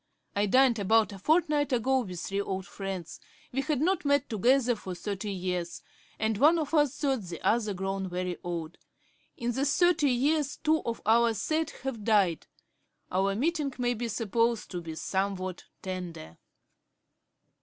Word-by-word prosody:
I 205 +1 +2
dined 255 +1 +4
about 215 +1 +3
a 195 - -9
fortnight 300 - +2
ago 260 +2 +2
with 180 -8 -5
three 195 +1 -2
old 190 -2 -3
friends; 190 -3 -6 0.3
we 270 - 0
had 295 -1 -1
not 370 +4 +1
met 285 -1 +2
together 245 +3 +3
for 190 -4 -7
thirty 200 +3 -4
years, 180 -2 -3 0.3
and 220 -1 0
one 310 +5 +6
of 310 -1 -3
us 295 -3 +3
thought 270 -5 0
the 175 -3 -7
other 215 -3 +1
grown 195 0 -3
very 180 0 -3
old. 170 -1 -5 0.6
In 240 -2 -1
the 265 +3 -1
thirty 310 0 +3
years 285 +3 +1
two 315 0 +2
of 230 - -3
our 230 +1 +4
set 315 +7 0
have 250 -6 -4
died; 200 -7 +2 0.6
our 195 +2 +1
meeting 290 +2 0
may 245 -1 +1
be 240 +1 -3
supposed 230 +1 0
to 175 -2 -4
be 165 -1 -7
somewhat 190 0 -2 0.2
tender.' 175 - -6
225 Hz, 160 wpm, -29 LUFS, 190-275 Hz, 0.6 s, one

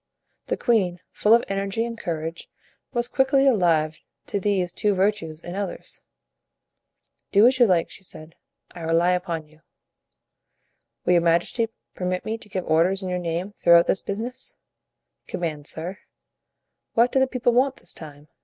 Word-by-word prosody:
The - - -1
queen, 190 -8 +1
full 215 +2 +4
of 235 - +2
energy 195 +3 -1
and 235 0 -5
courage, 165 -4 -5 0.4
was 240 -2 0
quickly 270 +1 +3
alive 165 - +2 0.3
to 200 - -2
these 185 -3 0
two 210 -2 +1
virtues 190 -5 0
in 175 +1 -8
others. 200 +1 -5 1.3
"Do 205 +2 +6
as 260 +1 +4
you 240 - +7
like," 175 -4 +2
she - - -11
said, 160 -3 -11 0.4
"I 175 - -11
rely 165 +2 +2
upon 175 -3 -2
you." 155 +1 -23 1.4
"Will 180 - +4
your 175 - +5
majesty 170 +7 +2 0.2
permit 180 0 -2
me 225 +1 -3
to 210 - -13
give 185 -2 -3
orders 175 +5 +2
in 185 - -3
your 180 0 -1
name 175 +3 -3
throughout 170 -3 +5
this 190 - +1
business?" 240 +6 -5 0.7
"Command, 155 -4 -4
sir." 175 +5 -5 1.0
"What 235 +2 +4
do 265 - +3
the 265 - +3
people 245 -2 +1
want 260 +2 +3
this - - -8
time?" 150 -2 -11
185 Hz, 160 wpm, -24 LUFS, 170-225 Hz, 1.4 s, you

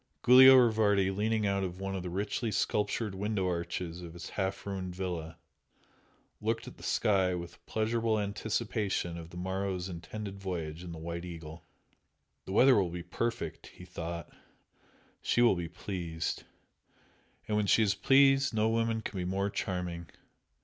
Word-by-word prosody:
Giulio 130 +1 +10
Rivardi, 110 -6 +4
leaning 110 +1 +1
out 100 -1 +1
of 90 0 -4
one 95 0 -3
of 95 - -3
the 90 - -5
richly 105 +5 -2
sculptured 105 +2 0
window 100 -1 -1
arches 85 0 -3
of 85 -2 -9
his 85 - -8
half 95 -1 -2
ruined 95 -3 -4
villa, 85 -3 -4 1.0
looked 115 +1 -1
at - - -10
the - - -15
sky 95 -3 +2
with 85 -1 -8
pleasurable 110 0 0
anticipation 105 -3 -2
of 85 -1 -8
the 90 - -10
morrow's 95 0 -2
intended 95 +4 -7
voyage 85 -4 -4
in 90 - -7
the 85 - -7
"White 85 +1 -5
Eagle." 85 -2 -9 0.8
"The - - -7
weather 130 +7 +6
will 95 -3 +2
be 85 0 -6
perfect!" 115 +6 -3
he - - -13
thought 85 0 -6 0.9
"She 120 - +2
will 115 -5 +5
be 85 -2 -4
pleased. 85 -2 -4 1.0
And 105 - 0
when 105 -1 +1
she 110 - +5
is 100 -2 +2
pleased 135 +4 +4
no 110 0 +3
woman 115 0 0
can 110 - -6
be - - -1
more 100 +2 -1
charming! 90 -4 -3
95 Hz, 160 wpm, -31 LUFS, 85-110 Hz, 1.0 s, Giulio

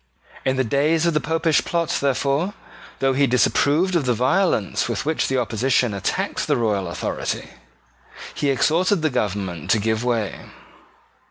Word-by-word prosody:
In 130 - +1
the 130 - +1
days 150 +7 +1
of 170 - +2
the 150 - +2
Popish 160 0 +1
plot, 170 -2 -1
therefore, 140 +7 0 0.4
though 135 0 +1
he 140 +1 +3
disapproved 150 +8 +2
of 160 -5 +1
the 125 - +2
violence 130 - +1
with 120 +5 -3
which 160 +1 0
the 135 - 0
opposition 125 0 +1
attacked 100 - -2
the 145 -3 +2
royal 105 -5 0
authority, 85 - -4 0.8
he 145 - -1
exhorted 165 +6 +2
the 155 - +1
government 100 -8 -3
to - - +4
give 110 +2 -1
way. 115 -5 -1
135 Hz, 155 wpm, -22 LUFS, 115-160 Hz, 0.8 s, to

